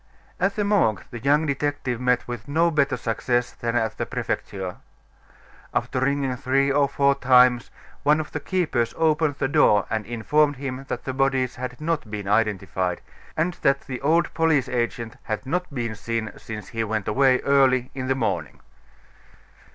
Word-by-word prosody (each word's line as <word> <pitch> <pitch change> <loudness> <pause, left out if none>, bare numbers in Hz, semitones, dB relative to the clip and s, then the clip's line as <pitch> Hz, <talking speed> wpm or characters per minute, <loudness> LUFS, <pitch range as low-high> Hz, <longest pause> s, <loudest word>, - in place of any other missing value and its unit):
At 195 +2 +1
the 210 - 0
Morgue 190 - +2
the 120 - -6
young 145 +5 +2
detective 140 -4 -2
met 125 -1 +1
with 120 -1 -6
no 165 +4 +2
better 145 -3 +1
success 120 +1 -1
than 115 0 -3
at 110 -2 -1
the - - -2
Prefecture. 95 -2 -4 1.0
After - - 0
ringing 135 -1 0
three 135 +1 +1
or 140 0 +3
four 140 0 +3
times, 125 -3 +4 0.3
one 150 +2 +3
of 155 - -5
the - - -3
keepers 145 -9 -1
opened 155 -2 +2
the 135 - -1
door 105 -7 +4
and 110 -1 0
informed 145 +6 +2
him 135 0 -5
that - - -4
the 130 - -4
bodies 130 -2 0
had 125 0 -6
not 155 -6 -2
been 105 -2 -5
identified, 95 -4 0 0.4
and 170 +3 +1
that 140 0 +3
the 125 -2 -7
old 160 +4 +2
police 160 -5 +2
agent 120 -2 -2
had 110 +4 -4
not 180 +5 -2
been 120 -5 -3
seen 115 0 -3
since 105 -3 -8
he 115 0 -2
went 110 -2 -2
away 130 +3 +3
early 130 -2 +3
in 130 -1 -4
the 130 - +1
morning. 90 - -2
130 Hz, 170 wpm, -24 LUFS, 115-145 Hz, 1.0 s, times